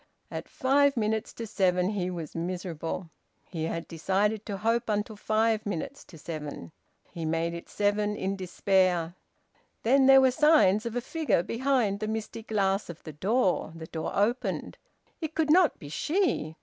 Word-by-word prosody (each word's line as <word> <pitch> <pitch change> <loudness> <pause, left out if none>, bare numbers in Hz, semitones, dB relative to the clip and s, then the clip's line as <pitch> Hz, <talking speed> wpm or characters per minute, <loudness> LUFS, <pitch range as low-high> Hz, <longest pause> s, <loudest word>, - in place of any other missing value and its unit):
At - - -6
five 280 +1 +3
minutes 220 0 0
to 230 - -6
seven 185 -2 +1
he 185 -4 -2
was 170 -4 -6
miserable: 170 -1 -4 0.4
he 160 -3 -4
had 165 0 -4
decided 200 +6 0
to 200 -2 -3
hope 230 +3 0
until 210 +1 -1
five 220 +1 +1
minutes 200 -6 -4
to 165 - -14
seven. 150 - -7 0.4
He 165 - -6
made 165 +1 -1
it 170 - -8
seven 210 0 0
in 195 -1 -2
despair. 185 -2 +1 0.7
Then 265 +3 +4
there 270 0 +9
were 260 -1 +5
signs 250 -8 +4
of 230 - -5
a 245 - 0
figure 305 - 0
behind 230 -3 0
the 215 - -3
misty 220 +1 -4
glass 200 -3 0
of 170 -1 -9
the 155 - -8
door. 185 - +1
The 165 -1 -8
door 160 0 -4
opened. 230 +5 -1 0.4
It 320 -1 -4
could 310 -2 +2
not 350 -1 +5
be 145 - -10
she! 295 - 0
205 Hz, 165 wpm, -28 LUFS, 170-230 Hz, 0.7 s, there